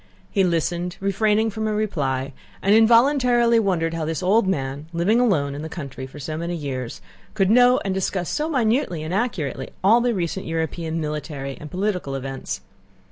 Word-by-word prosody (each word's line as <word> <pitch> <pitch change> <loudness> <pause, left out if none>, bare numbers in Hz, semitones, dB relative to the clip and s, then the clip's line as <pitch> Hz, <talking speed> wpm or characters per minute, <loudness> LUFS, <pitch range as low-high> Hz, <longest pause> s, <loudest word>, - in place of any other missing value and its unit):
He 195 - +2
listened, 175 0 -1
refraining 210 +3 +1
from 220 +1 -3
a 215 - 0
reply, 140 -10 -1 0.3
and 200 - +4
involuntarily 235 +1 +5
wondered 175 -6 0
how 165 -1 -2
this 160 +3 -3
old 200 +3 +3
man, 140 -4 -2
living 185 +8 +2
alone 160 - +2
in 145 - -6
the 160 - -6
country 135 -6 -7
for 135 - -13
so 155 +2 -4
many 170 +2 -3
years, 130 -6 -5 0.3
could 195 -2 +2
know 250 +2 +6
and 195 - 0
discuss 190 -2 -1
so 305 +2 -1
minutely 230 - +1
and 160 +3 -4
acutely 195 - -2
all 225 +5 +6
the 240 -1 +1
recent 180 +1 -3
European 165 0 -2
military 150 -3 -4
and 150 - -10
political 180 -6 -2
events. 135 0 -5
180 Hz, 175 wpm, -23 LUFS, 150-220 Hz, 0.3 s, know